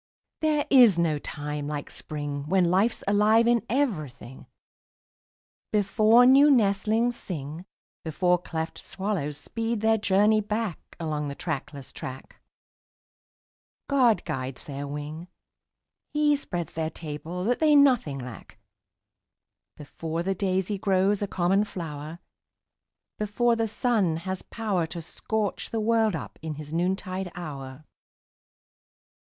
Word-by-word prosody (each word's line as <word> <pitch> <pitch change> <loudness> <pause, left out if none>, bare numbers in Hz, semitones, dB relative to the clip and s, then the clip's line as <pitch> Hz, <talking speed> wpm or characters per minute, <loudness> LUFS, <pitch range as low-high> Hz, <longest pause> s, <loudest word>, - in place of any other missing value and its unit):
There 305 -2 +1
is 245 -9 +7
no 160 -3 +1
time 145 0 -5
like 145 -1 -5
Spring, 145 -1 -5
When 180 -2 +3
life's 205 +5 +2
alive 210 +3 +4
in 240 -1 +3
everything, 155 - -2 1.2
Before 215 +3 +5
new 275 +3 +7
nestlings 225 0 +2
sing, 155 -2 -6 0.4
Before 175 +3 +1
cleft 160 -2 -5
swallows 190 -8 -3
speed 225 +6 -3
their 220 0 +3
journey 210 +2 +3
back 210 -3 -2 0.2
Along 150 -3 -2
the 140 - -5
trackless 140 -4 -5
track, 130 0 -9 1.5
God 255 -6 +3
guides 130 -5 -4
their 140 0 -5
wing, 150 +4 -6 0.9
He 295 -1 +3
spreads 175 - -5
their 160 -1 -2
table 160 +3 -6
that 240 +5 +1
they 305 -2 +5
nothing 250 - +4
lack, 125 -3 -9 1.2
Before 160 +3 -5
the 195 +2 0
daisy 190 +1 -1
grows 195 +1 +2
a 205 - 0
common 190 +2 +2
flower, 160 -5 -6 1.0
Before 230 +3 +1
the 225 0 0
sun 210 -7 +1
has 190 0 -3
power 200 -7 -2
To 170 - -6
scorch 205 +5 -3
the 225 - -2
world 220 -2 +2
up 160 - -7
in 155 -1 -4
his 150 +1 -8
noontide 185 +1 -1
hour. 140 -4 -7
185 Hz, 120 wpm, -26 LUFS, 155-220 Hz, 1.5 s, is